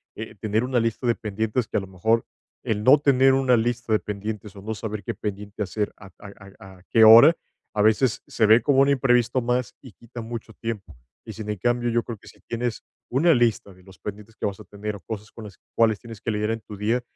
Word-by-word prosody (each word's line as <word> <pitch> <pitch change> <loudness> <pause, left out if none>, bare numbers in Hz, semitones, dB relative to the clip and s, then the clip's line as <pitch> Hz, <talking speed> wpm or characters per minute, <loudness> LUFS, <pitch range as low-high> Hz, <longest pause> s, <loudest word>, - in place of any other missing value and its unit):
eh, 110 - -7
tener 110 +3 0
una 125 -1 +1
lista 115 +2 -2
de 120 - +4
pendientes 110 +2 -2
que, - - -2
a - - +3
lo 95 - -7
mejor, 110 +5 0 0.4
el 105 -1 -2
no 130 +6 +7
tener 135 -2 +4
una 130 -2 +3
lista 120 0 -1
de 110 - +3
pendientes, 105 0 -6
o 100 - -10
no 110 +2 -3
saber 105 -2 -5
qué - - -3
pendiente 105 0 -6
hacer 105 +2 -3
a 100 - -14
a-a 100 -1 -13
a - - -22
qué 115 - +5
hora, 115 +9 +9 0.4
a 105 - 0
veces 110 +3 +2
se 110 - +1
ve 110 +3 +6
como 140 -2 +2
un 140 - +4
imprevisto 125 -2 +2
más 125 +1 -1
y 130 - -13
quita 120 +1 -10
mucho 115 0 -7
tiempo. 110 - -6 0.3
Y - - -8
sin 110 -1 -7
en 105 - -2
cambio, 120 +4 0
yo 120 0 +1
creo 115 -3 -7
que - - -19
si - - -16
tienes 120 -1 -3 0.3
una 160 +7 +4
lista 115 -6 +1
de 90 0 -21
los 95 0 -16
pendientes 105 +1 -8
que - - -4
vas 100 -2 -3
a - - -10
tener, 105 +1 -6
o 100 - -9
cosas 105 +2 -7
con 115 - -10
las 100 -2 -12 0.2
cuales 110 -2 +3
tienes 115 -3 -11
que 115 - -2
lidiar 105 +1 -1
en 115 - -2
tu 105 - -10
día, 110 +5 0
110 Hz, 240 wpm, -24 LUFS, 105-120 Hz, 0.4 s, hora